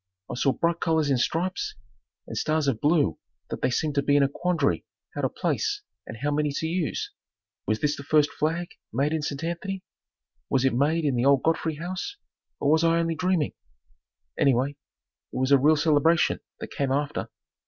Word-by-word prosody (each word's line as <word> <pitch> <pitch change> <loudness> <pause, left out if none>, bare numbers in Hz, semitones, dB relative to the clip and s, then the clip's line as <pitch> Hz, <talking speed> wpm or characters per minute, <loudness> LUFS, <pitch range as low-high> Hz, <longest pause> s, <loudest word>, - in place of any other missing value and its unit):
I - - -3
saw 135 +2 +2
bright 170 0 0
colors 160 -3 +1
in 130 - +2
stripes, 175 +8 -1 0.5
and - - -7
stars 155 -1 0
of 120 -5 0
blue 150 0 +2 0.3
that - - -4
they 125 - +2
seemed 150 +4 0
to 140 - +2
be 145 +1 +2
in 145 - +5
a - - +4
quandary 160 0 0 0.3
how - - -3
to - - +1
place 415 -1 -1 0.2
and 110 - -7
how 145 - +1
many 150 0 +1
to 160 - -2
use. 165 -1 -2 0.6
Was 110 +1 0
this 150 0 +1
the - - -8
first 150 +1 +3
flag 165 +3 -1 0.2
made 140 +6 +1
in 160 - 0
St. 145 0 -4
Anthony? 185 +3 -3 0.7
Was 135 -1 +2
it 135 - +3
made 150 +6 +2
in 140 -3 +2
the 120 - +1
old 140 -2 +4
Godfrey 160 -1 +1
House, 185 - -5 0.4
or 145 - +2
was 160 +1 +4
I 165 0 +4
only 165 0 +1
dreaming? 165 -1 0 0.9
Anyway, 135 0 +3
it 145 -2 -16
was 130 +1 +1
a 140 - +7
real 155 +3 +5
celebration 155 +2 +3 0.2
that - - -7
came 140 -2 -1
after. 145 +1 -1
150 Hz, 195 wpm, -26 LUFS, 140-165 Hz, 0.9 s, a